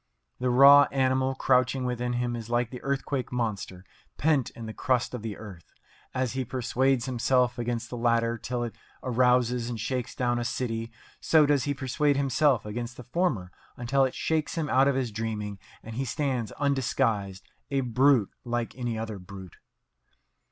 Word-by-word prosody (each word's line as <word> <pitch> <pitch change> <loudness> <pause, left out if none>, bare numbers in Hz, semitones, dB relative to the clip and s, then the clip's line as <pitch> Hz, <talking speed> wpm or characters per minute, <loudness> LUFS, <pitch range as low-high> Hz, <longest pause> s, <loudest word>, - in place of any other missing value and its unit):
The 125 0 0
raw 140 +3 +8
animal 130 0 +1
crouching 130 0 +2
within 125 0 -2
him 120 0 -1
is 115 -1 -7
like 120 0 0
the 125 - -8
earthquake 135 -1 -2
monster 105 -6 -3 0.3
pent 145 -4 +2
in 115 - -9
the 110 - -6
crust 125 0 0
of 125 - -4
the 110 -2 -5
earth. 95 -6 -11 0.4
As 130 -2 -1
he 130 0 -1
persuades 130 +1 0
himself 125 -1 +1
against 120 -1 -3
the 120 - -4
latter 115 0 +1
till 120 +1 -3
it 120 - -4 0.3
arouses 125 -1 +2
and 115 -2 -4
shakes 125 +2 -3
down 120 -1 0
a - - -1
city, 115 -1 -3 0.3
so 155 -2 +4
does 145 -2 +2
he 145 -1 -1
persuade 140 +2 +1
himself 140 -3 +2
against 120 +3 -5
the 125 - -8
former 125 - -1 0.3
until 135 +3 +2
it 130 - -1
shakes 160 0 -1
him 155 -3 -1
out 135 +2 +5
of 140 - +2
his 130 -4 -1
dreaming 105 -2 -4 0.2
and 115 - -8
he 130 +4 -2
stands 130 -4 -2
undisguised, 120 -8 -1 0.2
a 135 -1 +1
brute 125 -2 +3
like 120 -1 -3
any 120 -3 -3
other 110 -2 -5
brute. 95 0 -11
125 Hz, 175 wpm, -27 LUFS, 115-135 Hz, 0.4 s, raw